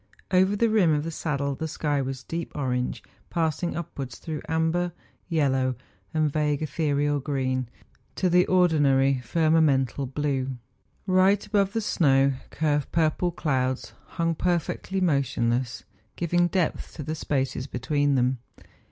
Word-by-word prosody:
Over 190 +2 +4
the 230 +3 +3
rim 195 -7 +4
of 145 - -1
the 165 - -4
saddle 140 -3 -2
the 160 +4 -4
sky 145 -2 -1
was 130 -1 -4
deep 165 +3 -5
orange 125 -3 -2 0.3
passing 165 0 -1
upwards 135 -7 -6
through 155 -2 -5
amber, 160 +2 0 0.4
yellow, 135 -5 +1 0.4
and 155 -2 +1
vague 150 -1 0
ethereal 145 -1 0
green 130 -3 -1 0.5
to 185 - +1
the 180 0 +4
ordinary 140 -7 +3
firmamental - - -20
40 165 - -2 0.8
MOUNTAIN 150 - +1
ADVENTURES. 130 -2 -1 0.5
blue. 185 -1 +4
Eight 200 +1 +2
above 200 -2 +1
the 225 - 0
snow 140 -9 +3 0.2
curve 150 -2 0
purple 165 +2 +1
clouds 130 -6 -1 0.2
hung 165 -1 +1
perfectly 180 +3 -1
motionless,, 130 -6 0 0.3
giving 175 +1 +2
depth 180 -2 -1
to 150 - -5
the 155 +3 -3
spaces 135 -4 -2
between 145 +3 0
them. 125 0 +1
150 Hz, 145 wpm, -26 LUFS, 135-170 Hz, 0.8 s, Over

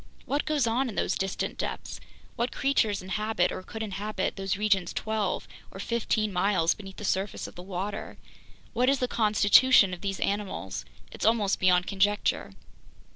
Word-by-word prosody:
What 285 +1 -1
goes 300 -5 +2
on 245 +3 +1
in 210 - -7
those - - 0
distant 195 0 -3
depths? - - -4 0.4
What 240 +2 -1
creatures 220 -8 +1
inhabit, 210 -1 0
or - - -5
could 220 +3 -6
inhabit, 210 +1 -3
those 195 0 -2
regions 200 -4 +1
twelve 215 -3 -2 0.2
or 195 - -10
fifteen 215 -1 -1
miles 180 -2 +2
beneath 195 -2 -11
the 210 - -6
surface 190 +1 -1
of - - -8
the 180 - -9
water? 195 +3 -5 0.6
What 250 +2 +3
is 275 - +3
the 250 - 0
constitution 215 -1 +5
of 180 - -7
these 195 -1 -3
animals? 200 - -3 0.3
It's - - -7
almost 215 -3 +2
beyond 180 -1 +4
conjecture. 205 +1 +1
205 Hz, 165 wpm, -28 LUFS, 190-220 Hz, 0.6 s, constitution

